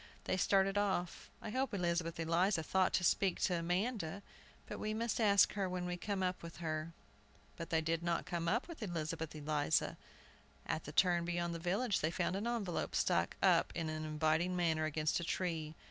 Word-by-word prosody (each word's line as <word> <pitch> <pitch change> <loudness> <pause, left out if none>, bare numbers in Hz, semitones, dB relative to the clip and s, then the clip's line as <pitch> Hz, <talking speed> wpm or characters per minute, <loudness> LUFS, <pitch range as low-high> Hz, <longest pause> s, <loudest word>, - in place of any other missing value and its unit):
They - - 0
started 195 +1 +3
off. 190 -4 -1
"I 215 - -4
hope 260 -2 -1
Elizabeth 170 -2 -1
Eliza 170 +2 +2
thought 185 +3 +2
to 185 - +2
speak 190 +1 +2
to 175 -2 +2
Amanda, 185 +1 -1 0.4
but - - -7
we 215 0 -2
must 230 +1 -1
ask 200 -2 +5
her 195 -2 -1
when 180 -1 -3
we 180 0 -2
come 195 +1 -2
up 185 0 -1
with 170 0 -9
her." 155 -1 -3 0.6
But 165 - -6
they 160 -1 +2
did 165 +1 0
not 170 -1 -1
come 170 -1 -2
up 235 +8 +1
with 335 -6 -9
Elizabeth 165 -4 -3
Eliza. 150 0 0 0.7
At 160 - -2
the - - -6
turn 175 +1 +3
beyond 175 0 -1
the 165 - -4
village, 195 +6 0
they 155 - +1
found 175 +1 -1
an 205 +4 -2
envelope 220 -7 -2
struck - - +1
up - - +4
in 165 -2 -2
an 155 0 -3
inviting 155 +3 +1
manner 160 -3 +1
against 155 +1 0
a - - -4
tree. 165 -3 -2
175 Hz, 190 wpm, -36 LUFS, 160-195 Hz, 0.7 s, ask